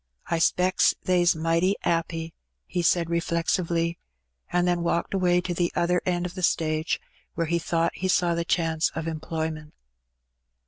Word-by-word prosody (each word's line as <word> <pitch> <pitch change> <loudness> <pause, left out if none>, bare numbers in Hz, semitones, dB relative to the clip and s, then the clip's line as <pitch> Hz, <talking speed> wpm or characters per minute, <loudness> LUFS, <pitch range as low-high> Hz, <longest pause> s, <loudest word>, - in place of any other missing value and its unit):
" - - -29
I - - -1
specks 180 +3 +3
they's 175 -2 +3
mighty 165 +4 +1
'appy,'' 165 -1 -1 0.3
he 175 - -2
said 170 0 +2
reflectively, 170 0 0 0.5
and 175 0 +2
then 175 -1 +1
walked 170 +2 -1
away 180 -2 +3
to 180 0 -3
the 175 0 0
other 180 +1 +2
end 175 -1 0
of 180 - -5
the 185 - -6
stage, 155 -2 +1 0.4
where 165 - 0
he 170 +2 0
thought 165 0 0
he 185 - -3
saw 175 -2 +2
the 170 0 -1
chance 165 -2 +1
of 160 0 -3
employment. 160 -1 -4
170 Hz, 165 wpm, -26 LUFS, 165-175 Hz, 0.5 s, specks